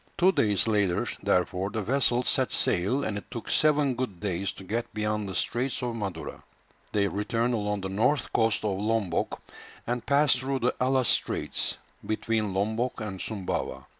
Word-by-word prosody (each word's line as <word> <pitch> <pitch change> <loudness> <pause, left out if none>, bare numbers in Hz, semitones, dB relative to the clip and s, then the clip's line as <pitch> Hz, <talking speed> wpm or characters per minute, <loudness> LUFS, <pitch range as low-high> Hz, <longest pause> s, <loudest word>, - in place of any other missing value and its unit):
Two 185 +2 +5
days 105 - +2
later 100 -5 +2 0.2
therefore 90 +2 +1
the 110 +1 -3
vessel 125 +1 +2
set - - +2
sail, 105 +11 +1
and 100 -1 -2
it - - -18
took 115 - -5
seven 150 -3 +3
good 120 -7 -4
days 95 -1 -1
to - - -11
get 115 +5 -3
beyond 105 -1 -1
the 95 - -5
straits 125 +2 -1
of 120 -2 -2
Madura. 95 -7 -5 0.5
They 100 -1 +2
returned 115 +5 0
along 105 -2 -1
the 95 - -3
north 125 +7 +1
coast 110 -2 +2
of 95 -2 0
Lombok, 105 -5 0 0.5
and 120 0 -2
passed 140 -1 +4
through 135 0 -2
the 125 - +2
Allas 130 -1 +3
Straits, - - 0 0.3
between 110 -1 -1
Lombok 110 +7 -1
and 105 -4 -5
Sumbawa. 100 -5 -3
110 Hz, 165 wpm, -28 LUFS, 100-125 Hz, 0.5 s, Two